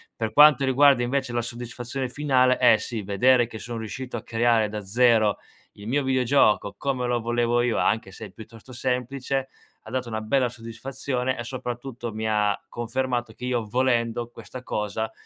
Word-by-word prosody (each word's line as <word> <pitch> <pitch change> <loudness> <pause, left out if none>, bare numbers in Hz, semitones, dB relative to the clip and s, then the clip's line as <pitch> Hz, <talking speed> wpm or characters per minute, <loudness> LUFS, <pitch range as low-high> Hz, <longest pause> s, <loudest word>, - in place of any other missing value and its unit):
Per 110 -1 -3
quanto 145 -2 +7
riguarda 135 -1 +5
invece 130 0 -1
la 120 - 0
soddisfazione 120 +2 -5
finale, 130 -2 +2
eh 125 -3 +6
sì, 110 -2 -4
vedere 120 +5 +3
che 110 -2 -9
sono 115 +1 -6
riuscito 120 +3 -6
a - - -8
creare 115 -1 +2
da 105 0 -5
0 110 +1 +3 0.4
il 100 +1 -11
mio 140 +3 +1
videogioco 130 -5 +2
come 130 -3 -2
lo 120 0 0
volevo 120 +1 +1
io, 120 -2 0
anche 105 -2 0
se 110 - -9
è - - -17
piuttosto 115 +4 -13
semplice, 130 +2 -2 0.4
m'ha 110 - -10
dato 130 -1 -2
una 110 0 -3
bella 125 +3 +1
soddisfazione 125 +2 -4
e 120 - -4
soprattutto 120 -1 -6
mi 110 0 -3
ha 105 -1 +1
confermato 120 0 -2
che 125 - -8
io 120 -3 -1
volendo 120 -1 0
questa 130 - -10
cosa 110 +1 -3
120 Hz, 175 wpm, -25 LUFS, 110-130 Hz, 0.4 s, quanto